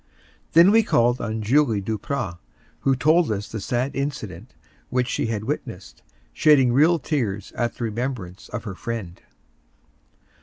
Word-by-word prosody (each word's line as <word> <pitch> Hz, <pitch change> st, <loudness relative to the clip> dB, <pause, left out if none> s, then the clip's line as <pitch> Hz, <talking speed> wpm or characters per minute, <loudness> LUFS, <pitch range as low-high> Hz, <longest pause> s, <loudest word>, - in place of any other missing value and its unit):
Then 170 Hz, +4 st, +7 dB
we 225 Hz, +1 st, +6 dB
called 120 Hz, -, +2 dB
on 110 Hz, -1 st, -3 dB
Julie 120 Hz, -1 st, +3 dB
Duprat, 100 Hz, -2 st, -3 dB, 0.4 s
who 135 Hz, -1 st, +2 dB
told 155 Hz, +3 st, +3 dB
us 105 Hz, 0 st, -3 dB
the 110 Hz, -, -5 dB
sad 125 Hz, +6 st, -2 dB
incident 120 Hz, -, -5 dB, 0.3 s
which 125 Hz, -1 st, 0 dB
she 115 Hz, -, -1 dB
had 110 Hz, -2 st, -2 dB
witnessed, 115 Hz, -6 st, -6 dB, 0.3 s
shedding 135 Hz, -5 st, +4 dB
real 160 Hz, +6 st, +5 dB
tears 115 Hz, -, -2 dB
at 120 Hz, -1 st, -2 dB
the -, -, -6 dB
remembrance 115 Hz, -5 st, -4 dB
of 105 Hz, -, -5 dB
her 105 Hz, -4 st, -5 dB
friend. 100 Hz, -4 st, -6 dB
120 Hz, 145 wpm, -23 LUFS, 105-140 Hz, 0.4 s, Then